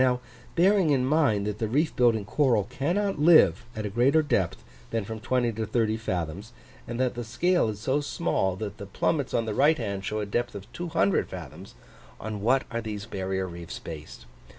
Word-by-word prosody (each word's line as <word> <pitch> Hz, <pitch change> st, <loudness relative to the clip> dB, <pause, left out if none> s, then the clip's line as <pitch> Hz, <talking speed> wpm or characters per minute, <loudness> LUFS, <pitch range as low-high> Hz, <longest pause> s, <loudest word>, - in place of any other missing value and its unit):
Now, 125 Hz, -1 st, +2 dB, 0.4 s
bearing 190 Hz, 0 st, +4 dB
in 135 Hz, -3 st, +3 dB
mind 135 Hz, -9 st, +2 dB
that 105 Hz, +1 st, -3 dB
reef 150 Hz, +8 st, +1 dB
building 115 Hz, -4 st, +3 dB
coral 120 Hz, -3 st, +2 dB
cannot 175 Hz, -, -1 dB
live 160 Hz, +2 st, +6 dB
at 110 Hz, -1 st, -4 dB
a -, -, -2 dB
greater 135 Hz, +8 st, +3 dB
depth 95 Hz, -, 0 dB, 0.3 s
than 115 Hz, -3 st, -2 dB
from 110 Hz, +1 st, -6 dB
20 120 Hz, 0 st, +1 dB
to 110 Hz, 0 st, -4 dB
30 110 Hz, 0 st, +1 dB
fathoms, 95 Hz, 0 st, -4 dB, 0.3 s
and 120 Hz, +1 st, -4 dB
that 130 Hz, -1 st, +1 dB
the 120 Hz, -, -5 dB
scale 145 Hz, +6 st, +1 dB
is 105 Hz, -1 st, -5 dB
so 135 Hz, +5 st, +1 dB
small 140 Hz, -, 0 dB
that 100 Hz, +1 st, -6 dB
the 100 Hz, -, -7 dB
plummets 140 Hz, +7 st, 0 dB
on 115 Hz, -, +1 dB
the 110 Hz, -, -2 dB
right 150 Hz, +7 st, +4 dB
hand 100 Hz, -5 st, -3 dB
show 110 Hz, +2 st, -2 dB
a 105 Hz, -, -2 dB
depth 120 Hz, +4 st, -2 dB
of 100 Hz, +4 st, -9 dB
200 165 Hz, -, 0 dB
fathoms, -, -, -9 dB, 0.4 s
on 110 Hz, -1 st, -5 dB
what 130 Hz, +5 st, +3 dB
are 115 Hz, 0 st, -2 dB
these 105 Hz, -2 st, -5 dB
barrier 95 Hz, -3 st, -2 dB
reefs 85 Hz, -2 st, -7 dB
based? 75 Hz, -5 st, -9 dB
115 Hz, 195 wpm, -27 LUFS, 100-140 Hz, 0.4 s, live